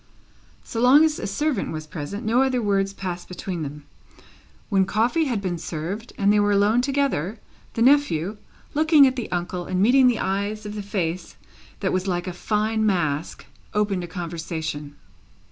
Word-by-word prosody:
So 225 Hz, -, -5 dB
long 275 Hz, +6 st, +7 dB
as 310 Hz, -1 st, 0 dB
a -, -, -3 dB
servant 260 Hz, +4 st, -1 dB
was 155 Hz, -1 st, -5 dB
present, 165 Hz, +7 st, -6 dB
no 235 Hz, +4 st, +3 dB
other 260 Hz, -2 st, +2 dB
words 195 Hz, -3 st, +1 dB
passed 185 Hz, -3 st, -5 dB
between 180 Hz, -1 st, -5 dB
them. 150 Hz, 0 st, -6 dB, 0.8 s
When 195 Hz, -3 st, +3 dB
coffee 230 Hz, -, +1 dB
had 235 Hz, -7 st, -2 dB
been 175 Hz, -3 st, -2 dB
served 175 Hz, +9 st, -5 dB
and 200 Hz, 0 st, +3 dB
they 210 Hz, -, +4 dB
were 205 Hz, 0 st, +3 dB
alone 205 Hz, +4 st, +3 dB
together, 265 Hz, -, 0 dB, 0.4 s
the 230 Hz, -, +2 dB
nephew, 220 Hz, -, +3 dB, 0.4 s
looking 310 Hz, -1 st, +6 dB
at 260 Hz, -1 st, +2 dB
the 240 Hz, -7 st, -5 dB
uncle 175 Hz, 0 st, -3 dB
and 185 Hz, -, -1 dB
meeting 250 Hz, +6 st, +5 dB
the 245 Hz, -3 st, +3 dB
eyes 200 Hz, +2 st, -2 dB
of 210 Hz, -, -5 dB
the 210 Hz, -, -4 dB
face 185 Hz, -4 st, -3 dB, 0.5 s
that -, -, 0 dB
was 185 Hz, +1 st, -1 dB
like 175 Hz, -1 st, -1 dB
a 180 Hz, -, -4 dB
fine 215 Hz, +4 st, 0 dB
mask, 170 Hz, -7 st, -1 dB, 0.3 s
opened 205 Hz, -3 st, +1 dB
a -, -, -5 dB
conversation. 160 Hz, -4 st, -5 dB
200 Hz, 175 wpm, -24 LUFS, 175-230 Hz, 0.8 s, long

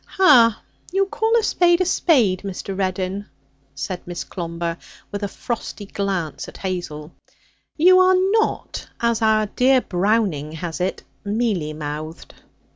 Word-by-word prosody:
'Hah! 245 Hz, -, +5 dB, 0.3 s
You 390 Hz, +2 st, +2 dB
call 445 Hz, +3 st, +1 dB
a 455 Hz, -, +1 dB
spade 345 Hz, -4 st, +3 dB
a 370 Hz, -, +2 dB
spade, 250 Hz, -, +3 dB
Mr. 195 Hz, 0 st, -5 dB
Reddin,' 190 Hz, +1 st, -2 dB, 0.5 s
said 160 Hz, +7 st, -4 dB
Miss 175 Hz, -1 st, -4 dB
Clomber, 170 Hz, -1 st, -4 dB, 0.3 s
with 205 Hz, -, -4 dB
a 205 Hz, -, -1 dB
frosty 215 Hz, -1 st, -5 dB
glance 195 Hz, -5 st, -3 dB
at -, -, -11 dB
Hazel; 175 Hz, -5 st, -5 dB, 0.7 s
'you 365 Hz, +4 st, +6 dB
are 370 Hz, 0 st, +5 dB
not, 390 Hz, +4 st, 0 dB
as 235 Hz, -1 st, +1 dB
our 215 Hz, -1 st, +3 dB
dear 255 Hz, +5 st, +3 dB
Browning 185 Hz, -, 0 dB
has 165 Hz, +1 st, -5 dB
it, 185 Hz, -, -2 dB, 0.2 s
"mealy 200 Hz, -7 st, -1 dB
mouthed".' 155 Hz, +1 st, -7 dB
200 Hz, 135 wpm, -21 LUFS, 175-260 Hz, 0.7 s, you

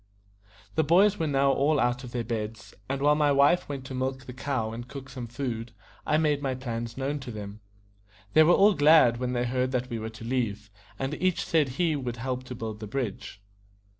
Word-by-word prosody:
The 160 Hz, -, +2 dB
boys 190 Hz, +7 st, +4 dB
were 160 Hz, -, 0 dB
now 140 Hz, -1 st, +3 dB
all 145 Hz, +2 st, +2 dB
out 120 Hz, +2 st, 0 dB
of 125 Hz, -, -8 dB
their 120 Hz, -1 st, -2 dB
beds; 110 Hz, -1 st, -5 dB, 0.2 s
and 135 Hz, +1 st, -2 dB
while 145 Hz, +1 st, +5 dB
my 150 Hz, -1 st, +3 dB
wife 140 Hz, +6 st, +3 dB
went 135 Hz, -2 st, -5 dB
to 130 Hz, -, -7 dB
milk 130 Hz, 0 st, -3 dB
the 125 Hz, -, -8 dB
cow 130 Hz, -4 st, -2 dB
and 120 Hz, +2 st, -7 dB
cook 135 Hz, 0 st, -9 dB
some 125 Hz, -2 st, -6 dB
food, 120 Hz, -2 st, -4 dB, 0.3 s
I 150 Hz, -, +3 dB
made 150 Hz, -2 st, +1 dB
my 135 Hz, -2 st, -1 dB
plans 120 Hz, -2 st, -5 dB
known 140 Hz, +2 st, -2 dB
to 130 Hz, -2 st, -8 dB
them. 105 Hz, -2 st, -7 dB, 0.7 s
They 155 Hz, -, +7 dB
were 155 Hz, +2 st, +6 dB
all 205 Hz, +2 st, +6 dB
glad 145 Hz, -7 st, +6 dB
when 125 Hz, 0 st, -2 dB
they 120 Hz, 0 st, 0 dB
heard 125 Hz, +1 st, 0 dB
that 125 Hz, 0 st, -2 dB
we 115 Hz, -, -2 dB
were 110 Hz, 0 st, -4 dB
to 110 Hz, 0 st, -11 dB
leave, 115 Hz, -5 st, -2 dB, 0.3 s
and 135 Hz, +4 st, -3 dB
each 185 Hz, -2 st, +1 dB
said 155 Hz, -4 st, +2 dB
he, 170 Hz, -3 st, +2 dB
would 125 Hz, -4 st, -4 dB
help 130 Hz, +1 st, -3 dB
to 125 Hz, -, -7 dB
build 110 Hz, -2 st, -6 dB
the 110 Hz, -, -6 dB
bridge. 105 Hz, -4 st, -5 dB
130 Hz, 220 wpm, -27 LUFS, 120-145 Hz, 0.7 s, They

